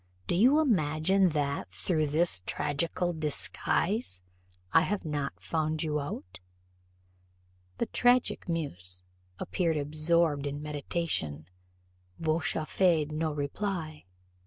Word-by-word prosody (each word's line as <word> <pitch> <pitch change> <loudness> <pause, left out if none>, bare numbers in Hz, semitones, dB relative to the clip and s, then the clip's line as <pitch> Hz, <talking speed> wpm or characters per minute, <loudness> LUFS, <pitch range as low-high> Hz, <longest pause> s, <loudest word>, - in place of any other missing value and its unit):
Do - - -1
you 250 - +5
imagine 185 - +3
that, 145 - -1
through 125 - 0
this 155 - +1
tragical 170 +4 0
disguise, 160 - -1 0.5
I 165 - +7
have 190 +1 -1
not 145 -2 -3
found 155 -1 -1
you 150 -1 0
out?" 95 -10 -6 1.4
The - - 0
tragic 245 -5 +2
muse, 90 - -4 0.3
apparently 165 - 0
absorbed 155 -1 +1
in 145 +1 -4
meditation, 145 - -2 0.7
vouchsafed 160 0 +1
no 155 +1 -1
reply. 155 - -3
155 Hz, 100 wpm, -30 LUFS, 145-170 Hz, 1.4 s, I